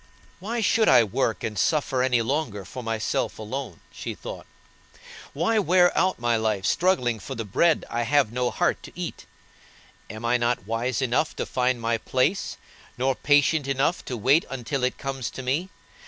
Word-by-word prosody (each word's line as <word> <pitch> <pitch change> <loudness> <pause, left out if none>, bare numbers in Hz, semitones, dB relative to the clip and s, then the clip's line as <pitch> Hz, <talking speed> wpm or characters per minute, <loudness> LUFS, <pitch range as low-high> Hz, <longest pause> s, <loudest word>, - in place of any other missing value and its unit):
"Why 225 +6 -3
should 220 +1 +3
I - - +7
work 110 -1 -1
and 105 -2 -3
suffer 145 -5 +1
any 125 -2 +2
longer 115 -7 -2
for 130 - -7
myself 115 -2 -2
alone?" 110 -3 -6
she - - -6
thought; - - -8 0.8
"why 195 +9 +1
wear 180 -1 +4
out 185 +1 +2
my 120 -1 +1
life 110 -4 -1
struggling 125 - +2
for 135 +6 -7
the 115 -2 -4
bread 160 - +2
I 120 - -2
have 130 -1 +2
no 125 0 0
heart - - 0
to - - -11
eat? - - -6 0.8
I 105 - -7
am 110 - -8 0.2
not 120 -4 0
wise 115 +4 -1
enough 130 +5 0
to - - -3
find 125 -1 0
my 115 0 0
place, 130 - 0 0.4
nor 130 +2 +1
patient 145 +2 +2
enough 140 +6 0
to 125 - -4
wait 135 +9 +4
until 135 +1 -3
it 125 - 0
comes 135 -3 -4
to 130 - -8
me. 145 +9 -1
130 Hz, 175 wpm, -25 LUFS, 115-150 Hz, 0.8 s, I